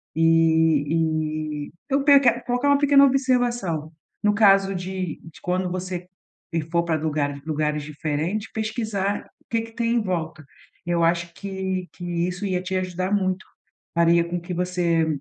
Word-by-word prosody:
e 160 -1 +2
e - - -20 0.2
eu 275 +1 +2
peque 275 -4 +5
colocar 245 +3 +1
uma 285 - +5
pequena 280 -1 +6
observação, 240 - +1 0.3
no 210 0 +4
caso 195 -2 +5
de 185 -2 -4
de 165 -1 -13
quando 180 +1 -1
você 180 -1 -4 0.5
e 165 - +1
for 170 +2 0
pra 165 -2 +1
lugare 145 -2 -1
lugares 150 -1 -1
diferentes, 155 +8 -3
pesquisar 215 -2 -2 0.2
o - - -31
que 230 -1 +1
que 225 0 -9
tem 235 0 0
em 235 - +3
volta. 165 -5 -3 0.4
Eu 170 -1 +1
acho 170 0 +1
que 190 -1 -4
que 175 - -11 0.2
isso 180 +3 -4
ia 185 -2 0
te 185 +1 -4
ajudar 185 +1 -2
muito, 190 -2 0 0.5
faria 170 0 +4
com 175 +1 -3
que 175 +1 -6
você 175 -2 +1
180 Hz, 160 wpm, -24 LUFS, 160-205 Hz, 0.5 s, pequena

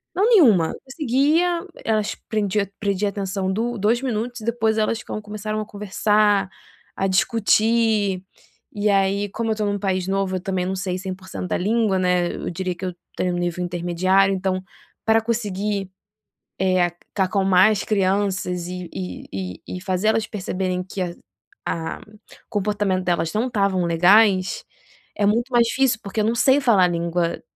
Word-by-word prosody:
Não 400 +4 +3
nenhuma, 225 - +5
conseguia 305 +6 +1 0.2
elas 215 -2 0
prendia 205 -2 0
prendia 200 0 0
atenção 195 -1 -2
do 235 +3 -2
dois 220 +4 +1
minutos 245 -1 -3
e - - -8
depois 225 -2 +1
elas 220 +2 0
com 215 - -5
começaram 215 +1 -4
a - - -5
conversar, 205 0 +1 0.5
a 195 - -1
discutir. 215 0 +2 0.5
E 210 0 0
aí, 200 +1 +2
como 225 +3 -3
eu - - +3
estou 210 -1 -1
num 205 0 -1
país 185 -2 -1
novo, 195 -1 0
eu - - -6
também 190 -2 -2
não 190 +1 -2
sei 185 -1 -2
100% 185 -1 -6
da - - 0
língua, 210 0 +1
né. 180 -1 +1
Eu - - -4
diria 180 +1 -3
que 185 +2 -6
eu 180 - -4 0.2
tenho 180 -1 0
um - - -2
nível 175 0 -2
intermediário, 180 +3 +2
então 185 0 -2 0.4
para 225 0 +4
conseguir, 205 -4 -2 0.7
eh, 185 -2 +3 0.3
acalmar 190 0 +4
as 210 - -1
crianças 190 -3 0
e 180 -1 -6
e 90 -2 -6
e 95 -2 -5 0.2
e 180 - -9
fazer 185 +1 -1
elas 220 0 +1
perceberem 185 -2 -2
que 190 +1 -6
a 175 -1 -1 0.6
a 165 -1 -4 0.5
comportamento 205 -2 0
delas 170 -2 0
não 225 +4 0
estavam 195 -6 +1
legais 190 - +4 0.5
é 205 - +1
muito 235 +5 +1
mais 235 -2 +4
difícil, 255 -2 +1
porque 200 +2 -2
eu - - +1
não 230 +2 +1
sei 265 +3 +4
falar 200 -8 +4
língua, 170 0 -1
200 Hz, 165 wpm, -22 LUFS, 185-220 Hz, 0.7 s, nenhuma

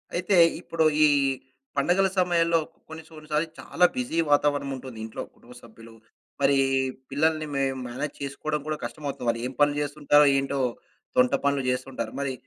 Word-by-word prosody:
అయితే, 185 +2 +1 0.2
ఇప్పుడు 165 -2 -1 0.2
ఈ - - +6 0.7
పండుగల 190 +2 +3
సమయంలో 170 -2 +3 0.3
కొన్ని, 160 0 -9
కొన్నిసార్లు 155 0 -3
చాలా 180 - +2
బిజీ 245 -10 -2
వాతావరణముంటుంది 140 -4 0
ఇంట్లో 110 - -7
కుటుంబ 125 +1 -16
సభ్యులు, 115 0 -14 0.5
మరి 140 0 +4 0.5
పిల్లల్ని 155 +2 +1
మే 140 0 0 0.2
మేనేజ్ 130 +4 -4
చేసుకోవడం 150 +2 -3
కూడా 155 0 -2
కష్టమోతుంది. 125 +1 -5
వాళ్ళు 115 0 -1
ఏం 130 - -8
పనులు 145 0 +3
చేస్తుంటారో, 145 0 +3
ఏంటో 135 0 -1 0.6
తొంట 125 0 +4
పనులు 140 -1 +1
చేస్తుంటారు. 125 -3 -3
మరి 140 -2 -2
145 Hz, 140 wpm, -26 LUFS, 130-160 Hz, 0.7 s, ఈ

